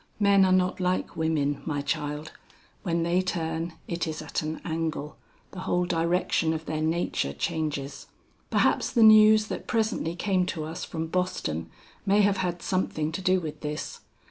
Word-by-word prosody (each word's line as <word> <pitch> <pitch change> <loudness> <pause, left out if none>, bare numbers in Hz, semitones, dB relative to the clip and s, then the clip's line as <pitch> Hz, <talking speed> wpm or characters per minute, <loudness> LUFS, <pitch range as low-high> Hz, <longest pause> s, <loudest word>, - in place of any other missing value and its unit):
Men 200 -2 +5
are 185 - +2
not 185 0 +2
like 180 0 -1
women, 150 -3 0
my 145 -3 -2
child; 150 +1 -3 0.5
when 170 -3 0
they 175 +2 +2
turn, 165 -2 -2
it 170 -1 -2
is 155 -1 -4
at 155 - -3
an 155 0 -4
angle, 160 -2 -3 0.4
the 185 - -8
whole 180 -1 0
direction 170 -1 +1
of 160 0 -5
their 155 -1 -2
nature 160 - 0
changes. 145 - -3 0.4
"Perhaps - - +2
the 235 - +5
news 215 0 +8
that - - -6
presently 220 -7 0
came 185 0 +1
to 160 -4 -3
us 160 +3 -5
from 160 -1 -4
Boston 160 - -2 0.3
may 205 +1 +4
have 200 -1 +3
had 180 -2 -2
something 160 -4 -1
to 170 - -4
do 185 0 +3
with 155 -4 -7
this. 150 0 -5
170 Hz, 170 wpm, -27 LUFS, 155-185 Hz, 0.5 s, news